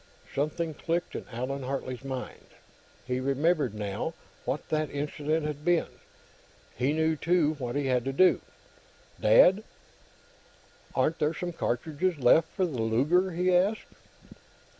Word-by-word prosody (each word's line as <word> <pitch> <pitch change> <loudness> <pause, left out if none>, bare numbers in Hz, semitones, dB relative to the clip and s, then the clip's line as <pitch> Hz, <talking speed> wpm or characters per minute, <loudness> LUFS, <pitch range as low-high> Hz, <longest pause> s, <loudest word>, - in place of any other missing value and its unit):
Something 155 +3 -1
clicked 170 +3 -2
in - - -6
Allan 130 +4 -3
Hartley's 130 -1 -4
mind. 130 -2 -6 0.6
He 125 0 -1
remembered, 140 - +1
now, 105 +10 -3 0.3
what 145 - -3
that 155 -1 0
incident 150 +2 -2
had 150 -1 -4
been. 175 0 +2 0.9
He 130 +4 +1
knew, 160 +1 +1
too, 165 -1 +2
what 120 -2 -4
he 145 -1 0
had 125 -2 +1
to 135 - -1
do. 170 +1 +4 0.8
"Dad, 180 - +6 1.3
aren't 160 - +1
there 155 +2 +1
some 175 +2 -4
cartridges 160 +6 -1
left 145 +5 +5
for 190 - 0
the 135 -9 -3
Luger?" 150 +12 +2
he 180 +1 +2
asked. 195 +5 +1
150 Hz, 135 wpm, -28 LUFS, 130-170 Hz, 1.3 s, Dad